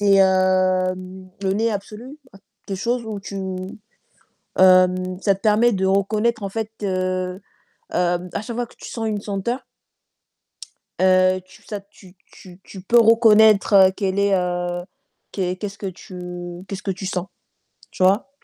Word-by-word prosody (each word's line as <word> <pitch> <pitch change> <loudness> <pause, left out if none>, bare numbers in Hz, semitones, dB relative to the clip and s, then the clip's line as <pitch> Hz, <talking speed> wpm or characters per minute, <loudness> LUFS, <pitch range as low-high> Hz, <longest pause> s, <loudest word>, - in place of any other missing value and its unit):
c'est, 200 -1 +4
heu, 185 -1 +3 0.5
le 190 0 +1
nez 225 +3 +1
absolu, 220 +8 -7 0.5
quelque 195 - -4
chose 240 +2 -1
où 210 -2 -5
tu 200 0 -8 1.2
hem, 185 0 +4
ça 200 -1 +2
te 195 - -14
permet 220 +2 +4
de 190 -2 -1
reconnaître 210 +4 +1
en 200 - -2
fait, 220 +2 -4
heu - - -1
heu, 185 0 -2 0.5
à 180 +1 -1
chaque 235 +2 -7
fois 245 - -1
que - - -21
tu - - -10
sens 225 -2 -4
une 210 -2 -2
senteur, 210 +6 -3 1.4
heu, 185 0 +4
tu 195 +3 -19
ça 205 -2 -6
tu 195 -2 -19 0.2
tu 180 -1 -15
tu 190 - -10
peux 235 +5 +4
reconnaître 215 -4 +6
qu'elle 195 -1 -1
est, 200 -1 +3
heu, 175 -1 -2 0.5
qu 185 -2 -2
qu'est-ce 200 +1 -6
que 205 - -7
tu 180 -1 -8
qu'est-ce 195 +1 -6
que 195 - -1
tu 190 +1 -6
sens. 185 0 -3 0.6
Tu - - -9
vois? 200 +8 +3
195 Hz, 155 wpm, -21 LUFS, 185-210 Hz, 1.4 s, reconnaître